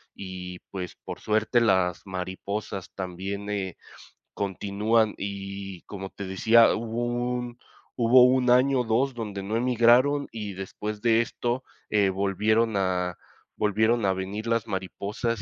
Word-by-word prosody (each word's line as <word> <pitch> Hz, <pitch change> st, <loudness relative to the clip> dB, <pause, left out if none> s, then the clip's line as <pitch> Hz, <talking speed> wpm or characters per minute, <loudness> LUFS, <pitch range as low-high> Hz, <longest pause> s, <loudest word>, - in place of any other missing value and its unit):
y, 90 Hz, -2 st, -7 dB
pues, 90 Hz, -3 st, -5 dB
por -, -, -7 dB
suerte, 110 Hz, +3 st, +2 dB
las 95 Hz, -6 st, +2 dB
mariposas 95 Hz, +1 st, -5 dB
también, 95 Hz, +2 st, -5 dB
eh, 95 Hz, -3 st, -3 dB, 0.6 s
continúan 105 Hz, +3 st, +1 dB
y, 100 Hz, -1 st, -6 dB
como 95 Hz, -1 st, -7 dB
te 100 Hz, -, -7 dB
decía, 110 Hz, +5 st, +5 dB
hubo 115 Hz, +1 st, -2 dB, 0.3 s
un 120 Hz, -1 st, -4 dB, 0.4 s
hubo 125 Hz, +1 st, +6 dB
1 125 Hz, 0 st, +3 dB
año, 130 Hz, +1 st, +4 dB
2, 125 Hz, +4 st, +1 dB
donde 105 Hz, -4 st, -5 dB
no 105 Hz, +3 st, -3 dB
emigraron, 125 Hz, +4 st, +4 dB
y 105 Hz, -3 st, -5 dB
después 105 Hz, +2 st, -6 dB
de 115 Hz, 0 st, +4 dB
esto, 120 Hz, +2 st, -2 dB, 0.3 s
eh, 100 Hz, -2 st, +3 dB
volvieron 105 Hz, +4 st, +1 dB
a 90 Hz, -2 st, 0 dB, 0.4 s
volvieron 110 Hz, +2 st, +2 dB
a 95 Hz, -, +3 dB
venir 95 Hz, +4 st, -4 dB
las 115 Hz, -1 st, 0 dB
mariposas, 100 Hz, +3 st, -3 dB
105 Hz, 130 wpm, -26 LUFS, 95-115 Hz, 0.6 s, hubo